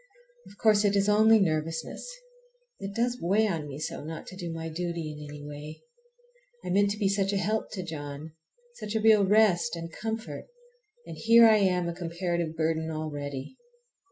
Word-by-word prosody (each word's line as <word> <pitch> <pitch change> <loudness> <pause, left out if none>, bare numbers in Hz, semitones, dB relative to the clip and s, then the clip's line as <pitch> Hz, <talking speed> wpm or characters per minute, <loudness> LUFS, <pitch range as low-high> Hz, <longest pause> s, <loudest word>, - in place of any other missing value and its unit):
Of 200 - -16
course 215 -1 +4
it 205 -1 +2
is 200 0 +2
only 220 +1 +6
nervousness. 160 - -2 0.7
It 195 0 -6
does 245 +1 0
weigh 200 +6 +3
on 165 -7 -2
me 140 -1 -7
so 155 - -5
not 160 +1 -7
to 185 - -10
do 175 -3 -5
my 165 0 -5
duty 170 -1 -4
in 150 0 -9
any 145 0 -9
way! 150 +1 -9 0.8
I - - -3
meant 200 +2 +3
to 205 - -3
be 205 -2 +1
such 195 0 +1
a 200 - 0
help 215 +3 -1
to 190 -3 -4
John, 150 -2 -7 0.5
such 210 +1 -5
a - - +2
real 215 -1 +5
rest 210 -1 +3
and 165 -1 -7
comfort, 225 +1 -5 0.6
and - - -9
here 230 +1 +7
I 220 -1 +6
am 180 -3 +1
a 170 - -2
comparative 170 -1 -3
burden 160 0 -1
already! 145 - -5
175 Hz, 185 wpm, -28 LUFS, 160-210 Hz, 0.8 s, here